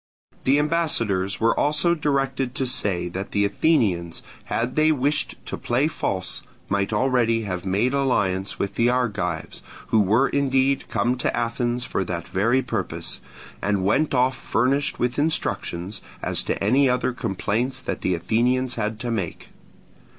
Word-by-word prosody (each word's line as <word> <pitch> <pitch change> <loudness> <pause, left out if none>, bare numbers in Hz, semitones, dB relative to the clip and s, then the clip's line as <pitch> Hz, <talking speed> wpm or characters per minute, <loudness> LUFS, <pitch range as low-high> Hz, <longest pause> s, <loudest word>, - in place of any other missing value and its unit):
The 135 +2 +4
ambassadors 120 - +1
were 115 0 +3
also 150 +4 +2
directed 135 -4 -1
to 135 - 0
say 100 -8 0
that 95 +3 -6
the 100 0 +3
Athenians, 100 - +1 0.2
had 120 +2 -2
they 155 +1 +4
wished 145 +1 0
to - - -4
play 125 +5 +1
false, 95 - -2 0.3
might 100 +1 0
already 115 -1 +2
have 95 -2 -4
made 105 +8 +1
alliance 100 -9 0
with 100 0 -2
the 120 +1 +2
Argives, 100 -10 -1 0.3
who 110 - +4
were 110 +7 +4
indeed 135 -1 +1
come 125 +2 +1
to - - -1
Athens 120 +1 -1
for 95 - -1
that 85 -2 -4
very 115 +8 +2
purpose, 120 - -3 0.4
and 100 -2 0
went 140 +8 +2
off 130 +1 +3
furnished 135 +7 0
with 125 +3 -1
instructions 105 - -1 0.2
as - - +1
to - - -1
any 130 +6 +4
other 125 0 +1
complaints 120 +3 -2
that - - -4
the 90 - +1
Athenians 120 +8 +1
had 110 -1 -2
to 120 -2 -2
make. 95 -7 -4
120 Hz, 150 wpm, -24 LUFS, 100-135 Hz, 0.4 s, The